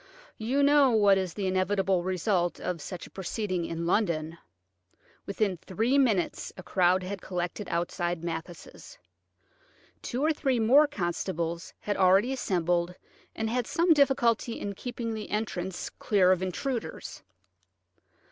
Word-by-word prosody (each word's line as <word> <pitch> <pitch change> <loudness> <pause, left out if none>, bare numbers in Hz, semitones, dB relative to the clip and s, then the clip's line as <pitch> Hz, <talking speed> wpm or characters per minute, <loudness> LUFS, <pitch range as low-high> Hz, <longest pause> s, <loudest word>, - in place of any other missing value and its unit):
You 255 +6 +1
know 285 -1 +5
what 205 -4 +4
is 185 -3 -4
the 200 - -3
inevitable 190 0 +1
result 180 -1 0
of 180 -3 -3
such 175 +3 -7
a - - -15
proceeding 185 -2 -3
in 165 0 -4
London. 170 -4 0 0.9
Within 200 -2 0
three 225 - 0
minutes 215 -10 +1
a 185 - -8
crowd 185 0 +2
had 195 +1 -5
collected 180 +2 -4
outside 175 0 -2
Mathis'. 170 - -7 1.0
Two 255 +3 -3
or 320 - +3
three 270 -5 0
more 270 +7 +6
constables 170 - -3
had 205 - -2
already 195 +7 +4
assembled, 175 -6 0 0.4
and 220 - -2
had 240 +1 -1
some 335 0 +3
difficulty 245 -5 +2
in 200 - -4
keeping 235 +2 -5
the 215 -1 -6
entrance 190 -4 -3
clear 190 -4 +2
of 185 -1 +2
intruders. 230 +6 -4
195 Hz, 135 wpm, -28 LUFS, 175-230 Hz, 1.0 s, more